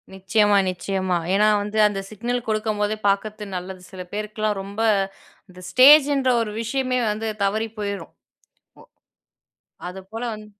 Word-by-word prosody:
நிச்சயமா, 205 +2 +2
நிச்சயமா. 185 0 -2 0.2
ஏன்னா 210 +2 +4
வந்து 210 +1 -5
அந்த 205 -2 -3
சிக்னல் 240 +3 -3
கொடுக்கும்போதே 215 -1 -1
பார்க்குறது 210 +2 -1
நல்லது. 185 +1 -6
சில 185 -1 -7
பேருக்குலாம் 215 0 -2
ரொம்ப 200 +3 -6 0.7
இந்த 185 0 -14
ஸ்டேஜ்ன்ற 275 +1 +6
ஒரு 220 -2 -3
விஷயமே 255 +2 -1
வந்து 220 +1 -3
தவறி 215 +3 0
போயிரும். 200 -1 -5 0.7
ஒ - - -14 1.1
அது 190 +1 -9
போல 225 +1 -6
வந் 215 0 -9
210 Hz, 130 wpm, -22 LUFS, 195-225 Hz, 1.1 s, ஸ்டேஜ்ன்ற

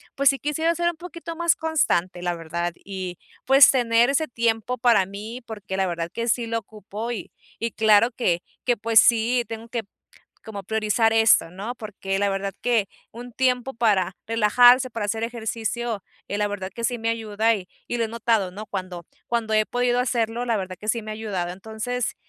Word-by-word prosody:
pues 275 0 +5
sí 275 -1 0
quisiera 315 +5 0
ser 345 +1 +1
un 345 - -5
poquito 335 -1 -8
más 340 0 +2
constante, 185 - 0
la 175 0 -1
verdad, 170 +1 -3
y 185 -3 -5 0.3
pues 270 +1 +8
tener 240 -2 +3
ese 305 +3 +1
tiempo 230 +1 0
para 235 -5 +4
mí, 210 +6 -8
porque 205 -4 -6
la 190 -1 +1
verdad 170 -1 -3
que 230 +4 -3
sí 235 +1 +1
lo 230 0 -1
ocupo, 215 +2 -7
y 230 - -6 0.3
y, 230 -1 -2
claro 220 +2 +4
que 175 -10 0 0.2
que 245 -2 +1
pues 225 +1 +5
sí, 240 +1 +3
tengo 225 0 -7
que, 235 0 -3 0.6
como, 205 -3 -7
priorizar 220 +2 +1
esto, 225 -6 +4
¿no? 200 +7 -6
Porque 195 -3 -4
la 205 - +2
verdad 195 0 -3
que 230 -5 +2 0.2
un 245 +2 -10
tiempo 255 +1 0
para 195 -6 +1
relajarse, 245 +4 +5
para 225 -2 -3
hacer 220 +2 -2
ejercicio, 230 -1 -3 0.3
eh, 205 - -2
la 210 - +1
verdad 195 -2 -5
que 235 - -5
sí 245 +2 +1
me 225 0 -2
ayuda, 225 0 +1
y 185 -2 -9 0.2
y 240 - -1
lo 230 - +1
he - - -3
notado, 225 -4 0
¿no? 210 +3 -7
Cuando 185 -3 -6 0.2
cuando 230 -2 -1
he 215 0 +3
podido 245 0 +1
hacerlo, 235 -1 -1
la 230 -2 +1
verdad 185 -2 -4
que 215 - -9
sí 230 0 +1
me 215 - -7
ha - - -4
ayudado. 200 -5 -3
Entonces, 220 +5 -4
225 Hz, 200 wpm, -24 LUFS, 200-240 Hz, 0.6 s, pues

